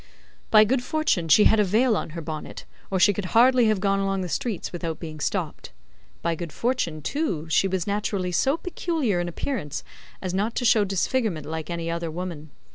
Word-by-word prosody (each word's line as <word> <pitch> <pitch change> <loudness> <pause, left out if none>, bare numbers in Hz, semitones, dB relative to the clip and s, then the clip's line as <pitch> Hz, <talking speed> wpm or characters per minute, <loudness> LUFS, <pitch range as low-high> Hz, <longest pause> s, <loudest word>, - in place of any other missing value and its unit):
By 215 - +8
good 245 +4 +1
fortune 245 - 0
she 160 +7 +6
had 220 - +5
a - - +5
veil 220 +5 +3
on - - -3
her - - -3
bonnet, 155 -1 -7 0.2
or 190 - 0
she 205 +3 +5
could 200 -1 -4
hardly 250 0 +6
have 215 -2 +2
gone 195 0 +1
along 195 -1 0
the 180 - -4
streets 235 - -3
without 165 -3 -4
being 155 -2 -7
stopped. - - -3 0.5
By 170 - +1
good 165 -1 -6
fortune, 170 - -1
too, 185 - -2
she 195 - +4
was 190 -2 -1
naturally 200 -3 -1
so 270 - +2
peculiar 320 - -1
in 175 - -1
appearance 175 - -4 0.4
as 185 -1 -4
not 210 +4 -1
to 245 - -1
show 220 -3 +5
disfigurement 195 - -1
like 160 +1 -5
any 170 -1 -3
other 170 0 -3
woman. 165 -2 -6
195 Hz, 200 wpm, -25 LUFS, 170-230 Hz, 0.5 s, By